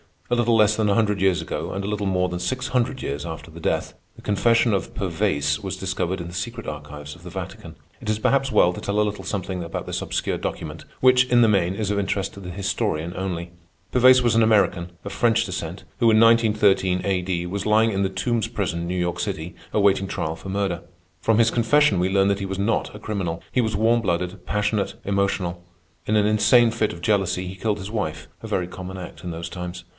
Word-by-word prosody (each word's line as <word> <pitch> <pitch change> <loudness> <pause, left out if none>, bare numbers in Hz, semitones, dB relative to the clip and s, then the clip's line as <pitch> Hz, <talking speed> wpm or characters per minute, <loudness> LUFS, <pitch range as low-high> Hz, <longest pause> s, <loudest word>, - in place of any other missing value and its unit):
A - - +4
little 120 -1 +3
less 110 -1 +4
than 110 -2 +2
a 100 - +3
hundred 105 -3 +2
years 95 -2 +2
ago, - - -4
and 100 +1 -3
a - - -3
little 105 -1 -2
more 90 -1 +1
than 90 0 -4
six 130 +9 -2
hundred 130 +1 0
years 70 +3 -3
after 80 -1 -7
her 85 - -10
death, - - -1 0.2
the - - -14
confession 115 +2 +2
of 95 - -2
Pervaise 70 0 0
was 95 -1 -4
discovered 95 -1 -2
in 85 - -6
the - - -10
secret 115 +6 -5
archives 75 0 -7
of - - -17
the - - -8
Vatican. - - -7 0.2
It - - -6
is 110 - +1
perhaps 135 +5 +2
well 90 -8 +4
to - - -7
tell 100 +1 -1
a - - +5
little 105 -1 -4
something 95 -2 -3
about 85 -1 -5
this - - -3
obscure - - -2
document, - - -5 0.2
which, 125 0 +6
in 125 -1 +4
the 115 - +5
main, 95 -3 +2
is 105 -1 -1
of 100 - 0
interest 100 0 -1
to - - -10
the 90 -2 -8
historian 95 -3 -2
only. 90 -2 -4 0.4
Pervaise 125 0 +6
was 120 - +3
an 115 - +4
American, 100 -5 +2
of 100 - -6
French 115 +2 +2
descent, 90 -2 -5 0.2
who 115 -2 +5
in 110 -1 +5
1913 105 -5 +4
A.D., 90 -2 -1
was 100 +2 -3
lying 110 +1 +4
in 100 -1 -1
the 95 - +1
Tombs 115 +3 -1
Prison, 90 -7 -3
New 90 +1 -2
York 90 -1 -1
City, 80 +4 -3 0.2
awaiting 100 -2 +3
trial 80 -3 -3
for 90 +4 -9
murder. 95 -3 -1 0.4
From 115 +5 +2
his 115 -1 +4
confession 120 -2 +3
we 90 +1 +1
learn 95 0 +3
that 100 0 +1
he 100 - -3
was 95 0 -4
not 105 +1 0
a - - -8
criminal. 95 -6 -3
He 125 - +2
was 110 -3 -1
warm 115 +3 +3
blooded, 90 -1 -2
passionate, 105 0 0
emotional. 95 -3 -1 0.4
In 110 - +1
an 105 -1 +4
insane 115 +2 +5
fit 110 -2 0
of 85 - -10
jealousy 95 -2 +1
he 95 - -6
killed 105 +1 -1
his 95 +2 -6
wife—a 105 -9 -5
very 90 -1 -1
common 95 +1 -8
act 90 0 -9
in 90 - -3
those 85 0 -5
times. 90 0 -6
100 Hz, 225 wpm, -23 LUFS, 90-110 Hz, 0.4 s, which